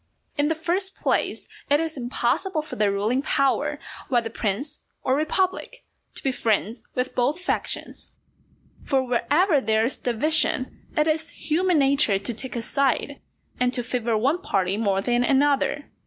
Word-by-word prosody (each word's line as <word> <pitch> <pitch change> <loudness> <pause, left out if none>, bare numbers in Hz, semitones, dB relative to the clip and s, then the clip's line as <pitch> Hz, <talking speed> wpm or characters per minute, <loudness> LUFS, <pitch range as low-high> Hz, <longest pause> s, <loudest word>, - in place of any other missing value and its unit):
In 290 0 +2
the 320 - +1
first 365 +4 -1
place, - - 0 0.2
it 290 +1 +4
is 325 0 -1
impossible 275 +7 0
for 310 - -7
the 210 -1 +2
ruling 215 +6 0
power, 275 -2 +1 0.3
whether 235 -3 +1
prince 225 +7 -2 0.2
or 260 - +2
republic, 375 - -1 0.3
to - - -3
be 270 - +1
friends 225 -1 0
with 250 0 -1
both 280 +7 +1
factions. 360 - -2 0.7
For 270 -2 +1
wherever 280 +7 +2
there 220 0 +2
is 255 - -2
division, 255 +1 0
it 300 - +4
is 320 +1 0 0.2
human 360 +2 +3
nature 275 -7 +4
to 200 +5 -3
take 255 +3 -5
a 235 - -2
side, 275 +3 0 0.4
and 250 0 +2
to 245 - -1
favour 235 -2 0
one 280 +11 +1
party 190 - 0
more 200 -3 +1
than 240 +3 +1
another. 285 +2 +2
265 Hz, 155 wpm, -24 LUFS, 235-310 Hz, 0.7 s, it